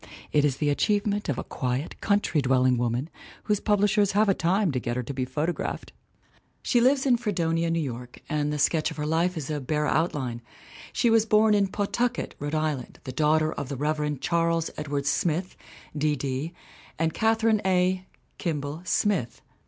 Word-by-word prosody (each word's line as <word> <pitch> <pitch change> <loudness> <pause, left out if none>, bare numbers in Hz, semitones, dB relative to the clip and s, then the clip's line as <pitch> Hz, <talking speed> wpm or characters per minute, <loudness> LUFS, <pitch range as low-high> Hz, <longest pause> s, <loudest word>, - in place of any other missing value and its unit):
It 150 - +3
is 140 -3 +1
the 145 0 +1
achievement 205 +5 0
of 135 - 0
a - - -3
quiet, 125 +4 -3
country 200 -7 +2
dwelling 130 -1 +3
woman 120 +4 -1 0.4
whose 210 -2 +1
publishers 205 -1 +2
have 210 +2 +3
a 195 - +5
time 185 +1 +1
to 130 - -1
get 120 0 -3
her 125 - -2
to 140 - -5
be 130 -1 -2
photographed! 150 +7 -3 0.7
She 240 - +3
lives 265 +2 +3
in 250 -3 +4
Fredonia, 170 -7 0
New 165 0 +1
York, 125 -2 -7
and 150 -1 -1
the 150 - -2
sketch 155 +2 +2
of 160 - -9
her 150 - -2
life 165 +3 +1
is 155 -1 -4
a 150 -1 -2
bare 150 +3 -1
outline. 145 -7 -1 0.5
She 240 -2 +2
was 225 -1 +4
born 215 0 +5
in 200 -1 +3
Pawtucket, 215 +5 -1
Rhode 145 +2 -3
Island, 155 -5 -2
the 130 - -5
daughter 155 +3 +2
of 140 -2 -5
the 140 - -4
Rev. 150 0 -1
Charles 165 0 0
Ed 150 - -5
wards 140 0 -2
Smith, 175 +2 -1 0.4
D.D., 145 0 -1 0.5
and 160 0 0
Catherine 225 -1 +2
A. 185 0 +1 0.3
(Kimball) 150 -2 -3
Smith. 180 - 0
155 Hz, 180 wpm, -26 LUFS, 145-200 Hz, 0.7 s, a